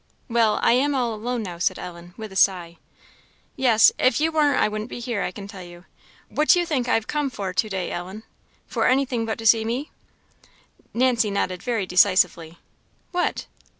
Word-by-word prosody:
"Well 230 -3 +2
I - - +5
am 275 +4 +2
all 240 -3 0
alone 235 +2 -3
now," 175 -4 -7
said - - 0
Ellen, 175 0 -10
with 220 -2 -8
a - - -11
sigh. 175 -3 +1 0.8
"Yes, 235 -5 +5
if 255 - +3
you 320 +2 +1
warn't 300 -2 +2
I - - +3
wouldn't 215 +2 -5
be - - -7
here, 235 -4 -3
I - - -1
can 195 +2 -9
tell 200 -3 -10
you. 175 0 -13 0.4
What 305 +1 -1
do 355 - +7
you 350 - 0
think 260 -7 -1
I - - +3
have 225 - 0
come 295 -2 -1
for 195 -6 -5
to 215 +4 0
day, 190 -3 -3
Ellen?" 190 +5 -6 0.4
"For - - 0
anything 255 -3 +1
but 220 - -2
to 225 - -8
see 225 0 +5
me?" 245 +6 -3 1.0
Nancy 240 -3 +2
nodded 185 -2 -2
very 230 -4 -2
decisively. 180 -3 +2 0.5
"What?" 355 -1 -1
220 Hz, 195 wpm, -23 LUFS, 185-250 Hz, 1.0 s, do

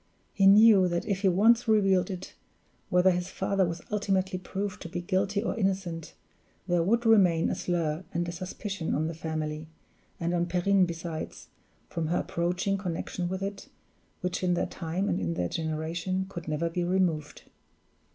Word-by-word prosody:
He 195 - +4
knew 205 -1 +7
that 175 -1 -1
if 195 -2 -1
he 200 - +3
once 220 +6 +4
revealed 195 -4 +3
it, 185 -1 -6 0.6
whether 180 +1 +5
his 175 0 -1
father 190 0 0
was 170 0 -5
ultimately 195 -2 0
proved 200 +3 -4
to 170 - -7
be 175 - -4
guilty 200 +3 0
or - - -1
innocent, 190 -6 -2 0.5
there 175 -2 +2
would 230 +7 +1
remain 185 -7 +4
a - - -1
slur 165 -1 -1
and 175 +1 -1
a - - -3
suspicion 185 +1 -4
on 155 - 0
the 165 - -3
family, 155 -1 -4 0.5
and 170 +1 -1
on 175 0 +1
Perrine 185 +2 +3
besides, 165 -1 -6 0.4
from 165 -2 -3
her 175 +2 +1
approaching 180 +3 -1
connection 175 -1 -3
with 190 +1 -3
it, 200 0 -5 0.5
which 180 0 -2
in 180 -1 +2
their - - 0
time 175 +3 -3
and - - 0
in 85 -2 -2
their 90 -1 -1
generation 165 +4 -2
could 175 -4 -8
never 155 +2 -1
be 175 +1 -2
removed. 175 -4 0
180 Hz, 170 wpm, -28 LUFS, 165-195 Hz, 0.6 s, knew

